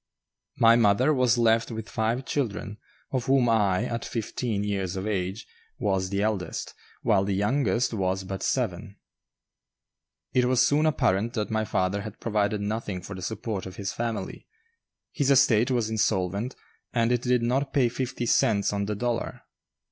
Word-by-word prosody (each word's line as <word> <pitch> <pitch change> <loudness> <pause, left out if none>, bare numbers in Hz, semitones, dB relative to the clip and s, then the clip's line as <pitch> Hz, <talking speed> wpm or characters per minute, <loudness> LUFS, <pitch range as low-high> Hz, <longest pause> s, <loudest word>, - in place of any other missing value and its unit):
My 115 0 +6
mother 120 +6 +4
was 125 -3 +3
left 115 -1 +3
with 110 -2 -6
five 115 +4 -1
children, 105 -6 -3 0.3
of 130 -2 -1
whom 130 -2 +4
I, 105 -3 +2
at 115 -1 -3
fifteen 115 -2 -3
years 100 -3 -2
of 95 +1 -3
age, 100 +1 -2 0.3
was 95 -4 0
the 100 +1 0
eldest, 100 -6 -2 0.3
while 100 -2 +3
the 100 0 -1
youngest 115 +2 +1
was 95 -2 -1
but 95 0 -5
seven. 105 -4 -2 1.4
It 125 -1 +3
was 125 0 +4
soon 150 +2 +3
apparent 115 -6 +1
that 110 -1 -2
my 110 0 0
father 95 0 0
had 110 0 -8
provided 105 -2 0
nothing 105 -3 -3
for 100 - -7
the 95 - -7
support 100 0 -4
of 95 - -9
his 100 0 -4
family; 115 -5 -4 0.6
his 140 -3 0
estate 125 -4 +5
was 120 -4 +1
insolvent, 105 +1 0 0.4
and 115 0 +1
it 120 -1 +1
did 125 -1 +1
not 135 +4 0
pay 130 -4 +3
fifty 120 0 -3
cents 105 -3 +2
on 100 0 -1
the 105 +1 -2
dollar. 120 +2 -3
110 Hz, 165 wpm, -26 LUFS, 100-120 Hz, 1.4 s, My